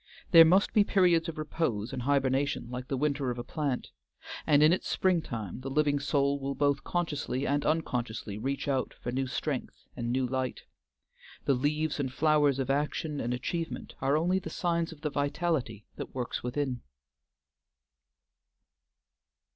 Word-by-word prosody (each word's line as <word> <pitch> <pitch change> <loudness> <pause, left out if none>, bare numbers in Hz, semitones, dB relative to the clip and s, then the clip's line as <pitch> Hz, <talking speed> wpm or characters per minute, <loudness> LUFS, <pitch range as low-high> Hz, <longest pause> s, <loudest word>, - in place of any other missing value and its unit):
There 165 -2 +11
must 185 +5 +4
be 215 -2 +6
periods 175 -4 +3
of 165 - -7
repose 140 -8 -2
and 130 - -3
hibernation 135 -1 +1
like 125 0 -5
the 135 -2 -2
winter 140 -1 0
of 120 - -3
a 120 - -4
plant, 140 -1 -3 0.6
and 145 0 +5
in 155 +2 +6
its 185 - -2
springtime 120 - 0
the 135 - -5
living 145 0 +2
soul 140 0 +1
will 135 0 -3
both 145 -1 +1
consciously 150 -6 -2
and 145 +1 +1
unconsciously 120 -9 -2
reach 135 +5 -2
out 135 -2 -1
for 120 - -5
new 130 +1 -1
strength 135 +1 -4
and 120 -2 -3
new 130 +1 +1
light. 130 0 -2 0.8
The 140 - +4
leaves 150 +4 0
and 130 -3 -1
flowers 150 -1 +3
of 135 -1 0
action 150 +1 -1
and 120 - -2
achievement 165 +7 -3
are 140 +3 +3
only 180 +4 +2
the - - -7
signs 170 -1 -1
of 155 -2 -12
the 150 - -2
vitality 145 - -1
that - - -7
works 125 -2 -3
within. 125 0 -2
140 Hz, 160 wpm, -29 LUFS, 130-155 Hz, 0.8 s, There